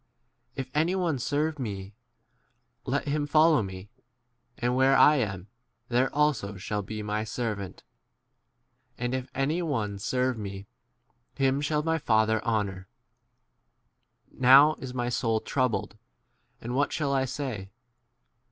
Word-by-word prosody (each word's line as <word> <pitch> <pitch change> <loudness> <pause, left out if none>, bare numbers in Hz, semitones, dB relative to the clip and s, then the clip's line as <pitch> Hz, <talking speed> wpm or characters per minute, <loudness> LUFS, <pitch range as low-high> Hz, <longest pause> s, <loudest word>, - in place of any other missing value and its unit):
If 130 -1 -5
any 165 +5 +1
on3 170 -7 0
serve 150 +3 -1
me, 100 -4 -5 0.9
let - - -1
him 145 0 0
follow 155 -1 +5
me; 95 +1 -8 0.7
and 125 0 0
where 135 +1 +4
I* 150 0 +6
am, 100 -6 -3 0.4
there 125 +2 +2
also 140 -9 0
shall 105 +1 -3
be 105 +2 -6
my 105 +1 -2
servant. 105 -4 -4 1.1
And 125 +1 -2
if 130 0 -3
any 150 +6 0
one 110 - -2
serve 125 +2 -1
me, 100 -1 -6 0.7
him 135 +1 +1
shall 150 +1 0
my 160 0 0
Father 110 -4 +2
honour. 100 -4 -2 1.4
27 - - -18
Now 135 +4 +8
is 130 -2 -7
my 120 -1 -1
soul 115 -2 0
troubled, 130 -1 -1 0.6
and 120 +2 -5
what 140 +3 +1
shall 140 -3 -1
I 135 -1 +2
say 125 -8 -5
125 Hz, 135 wpm, -27 LUFS, 105-145 Hz, 1.4 s, Now